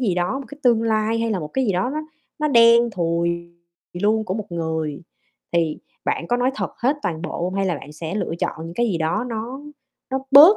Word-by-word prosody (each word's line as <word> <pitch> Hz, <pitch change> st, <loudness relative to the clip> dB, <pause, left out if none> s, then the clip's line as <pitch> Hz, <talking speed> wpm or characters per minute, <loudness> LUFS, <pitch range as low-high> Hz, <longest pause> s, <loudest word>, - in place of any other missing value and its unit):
gì 205 Hz, -8 st, +1 dB
đó, 180 Hz, +9 st, 0 dB
một 275 Hz, -, -7 dB
cái 285 Hz, -, -11 dB
tương 235 Hz, -3 st, +4 dB
lai 220 Hz, 0 st, +1 dB
hay 230 Hz, 0 st, 0 dB
là 195 Hz, -, 0 dB
một 150 Hz, -2 st, -5 dB
cái 265 Hz, -1 st, +2 dB
gì 200 Hz, -, +2 dB
đó 185 Hz, +7 st, 0 dB
nó 305 Hz, +2 st, -2 dB, 0.4 s
nó 300 Hz, 0 st, +1 dB
đen 235 Hz, -1 st, +6 dB
thùi 170 Hz, -2 st, -1 dB, 0.5 s
luôn 220 Hz, +1 st, +3 dB
của 185 Hz, -, -2 dB
một 210 Hz, -2 st, -4 dB
người, 160 Hz, -2 st, -2 dB, 0.5 s
thì 165 Hz, -3 st, +1 dB, 0.3 s
bạn 170 Hz, -, -1 dB
có 245 Hz, -, +2 dB
nói 250 Hz, +1 st, +2 dB
thật -, -, -2 dB
hết 270 Hz, +5 st, +2 dB
toàn 160 Hz, -2 st, -2 dB
bộ 180 Hz, -, -4 dB
hông? 185 Hz, +1 st, -2 dB
Hay 195 Hz, 0 st, +1 dB
là 180 Hz, -, +1 dB
bạn 150 Hz, -, -11 dB
sẽ 160 Hz, +3 st, -5 dB
lựa 205 Hz, -, -1 dB
chọn -, -, 0 dB
những 165 Hz, +1 st, -7 dB
cái 240 Hz, +4 st, +2 dB
gì 185 Hz, -7 st, 0 dB
đó 165 Hz, +8 st, 0 dB
nó 235 Hz, +4 st, -4 dB, 0.5 s
nó 265 Hz, -, +1 dB
bớt 305 Hz, +10 st, +10 dB
210 Hz, 240 wpm, -22 LUFS, 170-240 Hz, 0.5 s, bớt